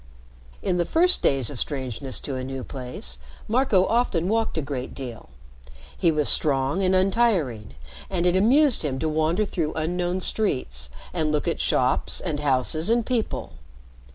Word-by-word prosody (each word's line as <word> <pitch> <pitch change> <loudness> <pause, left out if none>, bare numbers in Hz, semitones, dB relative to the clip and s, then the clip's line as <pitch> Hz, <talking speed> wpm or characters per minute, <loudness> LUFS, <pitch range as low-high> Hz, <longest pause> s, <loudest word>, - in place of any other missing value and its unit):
In 180 - 0
the 175 - +2
first 355 - +3
days 135 -3 +3
of 135 - -6
strangeness 130 -2 -2
to 140 - -4
a 130 -1 -4
new 135 0 -5
place, 125 - -6 0.3
Marco 225 -5 +3
often 210 -8 +1
walked 225 -2 0
a - - +1
great 135 -2 -5
deal. 125 -5 -8 0.7
He 170 - +2
was 150 -2 0
strong 140 +4 +2
and 185 0 +2
untiring, 185 - +1 0.3
and 180 -2 -1
it 180 0 +3
amused 255 +7 +4
him 140 -4 -2
to 160 - -1
wander 160 +6 +1
through 160 -5 -2
unknown 175 +3 -1
streets, 125 - -1 0.2
and 155 -3 0
look 150 -1 -1
at - - -1
shops, - - +1
and 145 - -3
houses, 145 - +1
and 235 0 +2
people. 240 -4 -2
160 Hz, 160 wpm, -24 LUFS, 135-195 Hz, 0.7 s, amused